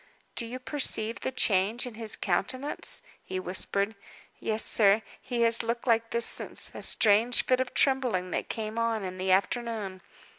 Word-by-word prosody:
"Do 235 Hz, -, -3 dB
you 245 Hz, +2 st, -6 dB
perceive 255 Hz, -4 st, -1 dB
the -, -, -3 dB
change 220 Hz, -1 st, +2 dB
in 245 Hz, -, -7 dB
his 220 Hz, -1 st, -1 dB
countenance?" 255 Hz, +10 st, 0 dB, 0.2 s
he 185 Hz, 0 st, -4 dB
whispered. 200 Hz, +3 st, -1 dB, 0.5 s
"Yes, 220 Hz, 0 st, +2 dB
sir. 210 Hz, 0 st, +4 dB, 0.2 s
He 240 Hz, -2 st, -1 dB
has 230 Hz, 0 st, +4 dB
looked 235 Hz, +1 st, -3 dB
like 230 Hz, -2 st, +2 dB
this 235 Hz, 0 st, +1 dB
since -, -, +1 dB
a -, -, -8 dB
strange 225 Hz, +3 st, +3 dB
fit 255 Hz, 0 st, +2 dB
of 260 Hz, -1 st, -3 dB
trembling 250 Hz, -10 st, +1 dB
that -, -, -3 dB
came 220 Hz, 0 st, -4 dB
on 230 Hz, -2 st, 0 dB
in 185 Hz, 0 st, -6 dB
the 185 Hz, 0 st, 0 dB
afternoon. 200 Hz, -1 st, -1 dB
225 Hz, 170 wpm, -28 LUFS, 200-240 Hz, 0.5 s, sir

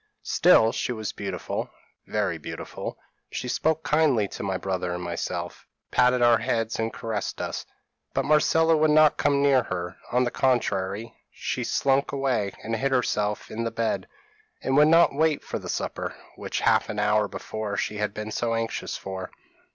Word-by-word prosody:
Still 110 Hz, 0 st, +5 dB
she -, -, -2 dB
was 110 Hz, -3 st, -3 dB
beautiful, -, -, -4 dB, 0.4 s
very -, -, -1 dB
beautiful. -, -, -6 dB, 0.3 s
She -, -, -4 dB
spoke 160 Hz, +5 st, 0 dB
kindly 145 Hz, -8 st, +3 dB
to -, -, -7 dB
my 95 Hz, -2 st, -1 dB
brother 90 Hz, -2 st, -2 dB
and 90 Hz, -, -5 dB
myself, 85 Hz, 0 st, -4 dB, 0.2 s
patted 125 Hz, 0 st, +4 dB
our 120 Hz, -1 st, +6 dB
heads 115 Hz, -2 st, -1 dB
and 115 Hz, 0 st, 0 dB
caressed 110 Hz, -2 st, -4 dB
us; -, -, -4 dB, 0.5 s
but -, -, +1 dB
Marcella 160 Hz, +2 st, +4 dB
would 155 Hz, 0 st, +3 dB
not 155 Hz, 0 st, +5 dB
come 140 Hz, 0 st, +2 dB
near 135 Hz, -2 st, +5 dB
her; 90 Hz, -5 st, -5 dB
on 125 Hz, +1 st, +3 dB
the 120 Hz, -, -1 dB
contrary, 110 Hz, -4 st, 0 dB, 0.2 s
she -, -, -3 dB
slunk 135 Hz, 0 st, +1 dB
away, 130 Hz, -8 st, 0 dB
and 115 Hz, +1 st, -2 dB
hid 135 Hz, +2 st, 0 dB
herself 105 Hz, -5 st, 0 dB
in 115 Hz, +1 st, -3 dB
the 115 Hz, -, 0 dB
bed, 115 Hz, 0 st, -2 dB, 0.6 s
and 130 Hz, -, +1 dB
would 150 Hz, +1 st, +7 dB
not 165 Hz, 0 st, +6 dB
wait 155 Hz, +1 st, +1 dB
for -, -, -4 dB
the -, -, -8 dB
supper, -, -, -3 dB, 0.2 s
which -, -, -4 dB
half -, -, +3 dB
an 105 Hz, -, -4 dB
hour 105 Hz, 0 st, +2 dB
before 105 Hz, 0 st, -5 dB
she 105 Hz, -, -2 dB
had 105 Hz, 0 st, -1 dB
been 110 Hz, +1 st, -6 dB
so 115 Hz, +1 st, 0 dB
anxious 115 Hz, 0 st, -3 dB
for. 95 Hz, -1 st, -6 dB
115 Hz, 175 wpm, -26 LUFS, 105-135 Hz, 0.6 s, would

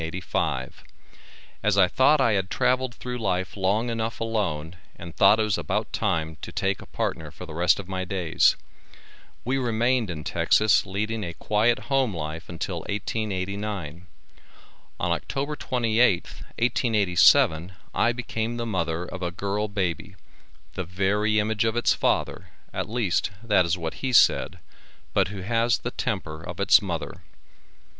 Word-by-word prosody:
As 105 Hz, -1 st, +1 dB
I 95 Hz, -2 st, +6 dB
thought 145 Hz, +9 st, +4 dB
I 125 Hz, -4 st, +3 dB
had 95 Hz, -2 st, 0 dB
travelled 130 Hz, -1 st, +1 dB
through 125 Hz, 0 st, -5 dB
life 95 Hz, -3 st, -1 dB
long 105 Hz, +5 st, 0 dB
enough 115 Hz, 0 st, -3 dB
alone 90 Hz, -8 st, -2 dB, 0.2 s
and 85 Hz, -2 st, -10 dB
thought 105 Hz, +3 st, +6 dB
it -, -, +3 dB
was 105 Hz, -4 st, 0 dB
about 80 Hz, -, -2 dB
time 80 Hz, 0 st, -1 dB
to -, -, -7 dB
take 95 Hz, 0 st, -1 dB
a -, -, -12 dB
partner -, -, -3 dB
for -, -, -10 dB
the -, -, -9 dB
rest 85 Hz, +4 st, +3 dB
of 95 Hz, -, -7 dB
my 95 Hz, -1 st, -3 dB
days. 90 Hz, -3 st, +2 dB, 0.9 s
We 135 Hz, +3 st, 0 dB
remained 120 Hz, -1 st, +1 dB
in 80 Hz, -3 st, -5 dB
Texas 105 Hz, +4 st, +3 dB
leading 105 Hz, +3 st, -2 dB
a 85 Hz, -2 st, -5 dB
quiet 110 Hz, +6 st, +2 dB
home 130 Hz, -7 st, +2 dB
life 80 Hz, +1 st, -6 dB
until 85 Hz, +2 st, -4 dB
1889. 100 Hz, -5 st, -3 dB, 0.9 s
On -, -, 0 dB
October 140 Hz, +2 st, -2 dB
28th, 115 Hz, -7 st, +1 dB, 0.2 s
1887, 100 Hz, -7 st, +3 dB, 0.2 s
I 120 Hz, -, +3 dB
became 120 Hz, -1 st, -3 dB
the 120 Hz, -, -3 dB
mother 85 Hz, -6 st, -1 dB
of 95 Hz, +1 st, -8 dB
a 90 Hz, -, -1 dB
girl 100 Hz, +4 st, -2 dB
baby, 100 Hz, -1 st, -3 dB, 0.6 s
the 95 Hz, -, -3 dB
very 100 Hz, +4 st, 0 dB
image 110 Hz, +1 st, +1 dB
of 115 Hz, 0 st, 0 dB
its 120 Hz, -, +3 dB
father, -, -, -1 dB, 0.3 s
at -, -, -3 dB
least 110 Hz, -6 st, 0 dB
that 105 Hz, -6 st, +3 dB
is 85 Hz, +2 st, 0 dB
what 80 Hz, -2 st, -4 dB
he 130 Hz, -, -3 dB
said, -, -, +4 dB, 0.6 s
but -, -, +3 dB
who 95 Hz, +1 st, -7 dB
has 115 Hz, +4 st, +1 dB
the 125 Hz, -, -5 dB
temper 80 Hz, -10 st, -3 dB
of 85 Hz, +1 st, -8 dB
its 100 Hz, -, +6 dB
mother. 85 Hz, -5 st, -5 dB
100 Hz, 150 wpm, -25 LUFS, 90-115 Hz, 0.9 s, I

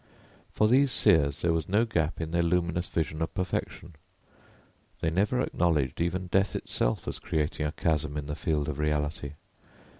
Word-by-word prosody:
For 105 Hz, -, +2 dB
these 130 Hz, +4 st, +4 dB
seers 80 Hz, -, +3 dB
there 85 Hz, -1 st, +3 dB
was 80 Hz, +1 st, -2 dB
no 105 Hz, +4 st, +3 dB
gap 85 Hz, -8 st, -1 dB
in 80 Hz, -1 st, -4 dB
their 85 Hz, 0 st, +2 dB
luminous 85 Hz, 0 st, 0 dB
vision 80 Hz, -1 st, -2 dB
of 80 Hz, -, -3 dB
perfection. 90 Hz, -2 st, -3 dB, 1.1 s
They 80 Hz, -, 0 dB
never 105 Hz, +8 st, +1 dB
acknowledged 80 Hz, -, 0 dB
even 90 Hz, +2 st, -1 dB
death 95 Hz, +2 st, +1 dB
itself -, -, -1 dB
as -, -, -4 dB
creating 75 Hz, -3 st, -1 dB
a -, -, -3 dB
chasm 75 Hz, -2 st, -1 dB
in 75 Hz, -, -4 dB
the 75 Hz, 0 st, -4 dB
field 75 Hz, -3 st, -1 dB
of 75 Hz, -2 st, -4 dB
reality. 75 Hz, -1 st, -1 dB
80 Hz, 170 wpm, -28 LUFS, 75-90 Hz, 1.1 s, these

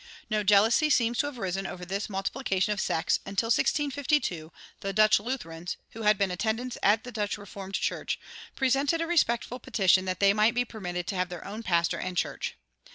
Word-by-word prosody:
No 215 Hz, -1 st, +1 dB
jealousy 215 Hz, +9 st, +4 dB
seems 235 Hz, -4 st, +2 dB
to 290 Hz, -, +2 dB
have 290 Hz, -3 st, -7 dB
arisen 190 Hz, -1 st, -2 dB
over 180 Hz, 0 st, -7 dB
this 195 Hz, +4 st, -3 dB
multiplication 195 Hz, 0 st, -1 dB
of 200 Hz, -, -3 dB
sects 160 Hz, -, +1 dB
until, 200 Hz, +4 st, -2 dB
in 290 Hz, +4 st, +2 dB
1652, 260 Hz, -, -1 dB, 0.3 s
the 195 Hz, 0 st, -3 dB
Dutch 215 Hz, 0 st, +5 dB
Lutherans, 180 Hz, -8 st, -5 dB
who 225 Hz, -, -8 dB
had 210 Hz, -1 st, +4 dB
been 195 Hz, -2 st, +1 dB
attendants 225 Hz, +6 st, -2 dB
at 210 Hz, +3 st, +3 dB
the 250 Hz, -, -8 dB
Dutch 210 Hz, -2 st, -2 dB
Reformed 195 Hz, -1 st, -8 dB
Church, -, -, -2 dB, 0.4 s
presented 275 Hz, +4 st, +2 dB
a 330 Hz, -, 0 dB
respectful 250 Hz, -7 st, +1 dB
petition 190 Hz, -5 st, +3 dB
that 185 Hz, 0 st, -2 dB
they 200 Hz, 0 st, +5 dB
might 215 Hz, +3 st, +3 dB
be 245 Hz, 0 st, +2 dB
permitted 180 Hz, -6 st, -5 dB
to 195 Hz, -, -3 dB
have 180 Hz, 0 st, 0 dB
their 175 Hz, -2 st, -8 dB
own 210 Hz, +3 st, -6 dB
pastor 170 Hz, -5 st, +1 dB
and 185 Hz, -1 st, -4 dB
church. -, -, -2 dB
210 Hz, 195 wpm, -28 LUFS, 190-240 Hz, 0.4 s, Dutch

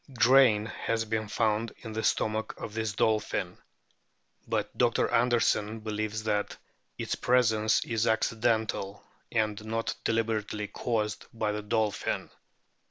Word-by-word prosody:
Grain 120 Hz, -4 st, +6 dB
has 115 Hz, 0 st, -2 dB
been 110 Hz, -1 st, -2 dB
found 110 Hz, +1 st, 0 dB
in 110 Hz, -2 st, -6 dB
the 110 Hz, -, -2 dB
stomach 110 Hz, 0 st, 0 dB
of 105 Hz, -, -7 dB
this 110 Hz, -2 st, -2 dB
dolphin; 110 Hz, +1 st, 0 dB, 0.9 s
but -, -, -2 dB
Dr. -, -, +2 dB
Anderson 115 Hz, -2 st, +2 dB
believes 110 Hz, 0 st, -3 dB
that 105 Hz, -1 st, -1 dB, 0.4 s
its -, -, -3 dB
presence 115 Hz, -3 st, +2 dB
is 115 Hz, -2 st, 0 dB
accidental 110 Hz, -2 st, 0 dB, 0.3 s
and 110 Hz, -2 st, 0 dB
not 115 Hz, +1 st, -2 dB
deliberately 110 Hz, -2 st, -1 dB
caused 105 Hz, -2 st, -2 dB
by 110 Hz, -2 st, -1 dB
the 105 Hz, 0 st, -3 dB
dolphin. 110 Hz, -1 st, -1 dB
110 Hz, 120 wpm, -29 LUFS, 105-115 Hz, 0.9 s, Grain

